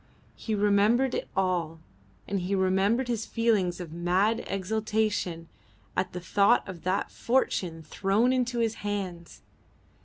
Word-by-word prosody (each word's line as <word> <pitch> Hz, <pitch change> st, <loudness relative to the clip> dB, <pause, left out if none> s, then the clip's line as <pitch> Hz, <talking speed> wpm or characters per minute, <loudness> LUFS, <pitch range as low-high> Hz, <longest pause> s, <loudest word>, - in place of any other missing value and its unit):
He 220 Hz, -, -3 dB
remembered 210 Hz, +5 st, +3 dB
it -, -, -2 dB
all, 175 Hz, -4 st, 0 dB, 0.5 s
and 195 Hz, 0 st, -1 dB
he 185 Hz, +2 st, -1 dB
remembered 195 Hz, +6 st, +2 dB
his 230 Hz, -3 st, -2 dB
feelings 210 Hz, -7 st, +1 dB
of 170 Hz, -3 st, -7 dB
mad 185 Hz, +6 st, +1 dB
exultation 205 Hz, -3 st, -1 dB, 0.5 s
at 185 Hz, 0 st, -1 dB
the 180 Hz, -, -5 dB
thought 200 Hz, +6 st, +3 dB
of 180 Hz, -3 st, -8 dB
that 185 Hz, +2 st, -1 dB
fortune 180 Hz, -9 st, 0 dB
thrown 200 Hz, +10 st, +1 dB
into 245 Hz, -1 st, 0 dB
his 230 Hz, -2 st, +1 dB
hands. 190 Hz, -5 st, -5 dB
200 Hz, 130 wpm, -28 LUFS, 180-220 Hz, 0.5 s, remembered